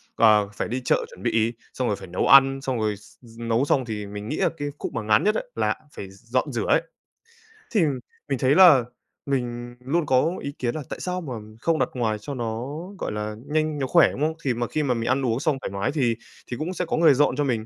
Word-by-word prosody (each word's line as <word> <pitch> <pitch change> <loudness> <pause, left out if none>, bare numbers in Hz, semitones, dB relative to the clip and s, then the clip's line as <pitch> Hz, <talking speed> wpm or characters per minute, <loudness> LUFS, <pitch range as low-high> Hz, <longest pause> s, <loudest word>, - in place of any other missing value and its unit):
ờ, 105 -3 +5
phải - - -3
đi 125 +3 -3
chợ - - +2
chuẩn - - -13
bị, 115 +1 +1 0.2
xong 130 -2 -1
rồi 105 - +1
phải 95 - -10
nấu 90 - -1
ăn, 135 0 +6
xong 130 -3 -2
rồi 105 -1 0
x 105 - -19 0.2
nấu 115 +3 +1
xong 130 -3 +1
thì 105 -3 -4
mình 105 +1 -7
nghĩ 150 - -2
là - - +2
cái 145 0 -3
khúc - - -5
mà 115 - -2
ngán 105 +8 +3
nhất 210 +1 +2
ấy - - -3
là - - +1 0.2
phải 95 - -7
d 100 +4 -19
dọn 135 +3 +1
rửa 115 -3 -2
ấy. - - +4 0.9
Thì 210 - +3 0.5
mình 135 - 0
thấy 135 +2 +3
là 165 -10 +8 0.4
mình 120 -3 -3
luôn 150 +5 0
có 145 +5 +2
ý 140 - -4
kiến 120 +1 -1
là 155 - -3
tại - - -5
sao 180 0 -3
mà 135 -6 -6 0.3
không 165 -1 +1
đặt - - +1
ngoài 110 -4 0
cho 140 - -6
nó, 120 0 -3 0.3
gọi - - -3
là, 105 0 -4
nhanh, 155 -1 0
nó 135 - -1
khỏe, - - +5
đúng 140 - -7
không? 160 +1 +1
Thì 130 -3 +1
mà 120 0 -2
khi 155 - -1
mà 130 -3 +1
mình 115 0 -2
ăn 130 0 +1
uống 115 +1 0
xong 145 -2 +1
thoải - - -4
mái 100 +6 -1
thì 125 -7 +1 0.3
thì 125 - -5
cũng 170 +4 -3
sẽ 180 - -2
có - - -1
người 160 -4 +6
dọn 140 -1 +3
cho 145 - 0
mình. 115 -5 -1
125 Hz, 260 wpm, -24 LUFS, 115-145 Hz, 0.9 s, là